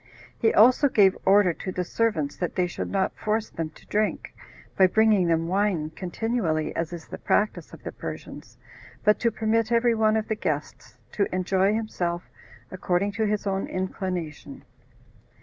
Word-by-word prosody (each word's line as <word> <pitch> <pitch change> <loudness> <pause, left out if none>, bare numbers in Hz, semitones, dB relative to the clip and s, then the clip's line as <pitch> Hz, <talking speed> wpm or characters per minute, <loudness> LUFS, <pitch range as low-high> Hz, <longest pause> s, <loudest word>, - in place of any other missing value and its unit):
He 225 - +3
also 255 +6 +5
gave 200 -6 +4
order 195 -2 +5
to 185 - -6
the 180 - -2
servants 170 -8 -1
that 175 - -3
they 180 - +2
should 175 - -5
not 195 -1 0
force 215 0 -2
them 165 -1 -4
to - - -17
drink, 215 0 -1 0.4
by 190 - +6
bringing 215 -2 +3
them 165 0 +1
wine 185 -5 0
continually, 180 -3 -2
as 165 0 -2
is 170 -2 -7
the - - -8
practice 210 - 0
of - - -13
the - - -5
Persians, - - -9 0.5
but 210 - +4
to 235 - +2
permit 225 +1 0
every 235 0 +3
one 220 -1 +2
of 220 - -2
the 220 - 0
guests 155 -8 -4
to 200 - 0
enjoy 190 +2 +1
himself 180 -6 -2 0.5
according 185 +2 0
to 220 +1 -1
his 210 0 -1
own 195 -1 -1
inclination. 185 -4 -5
195 Hz, 165 wpm, -25 LUFS, 175-220 Hz, 0.5 s, by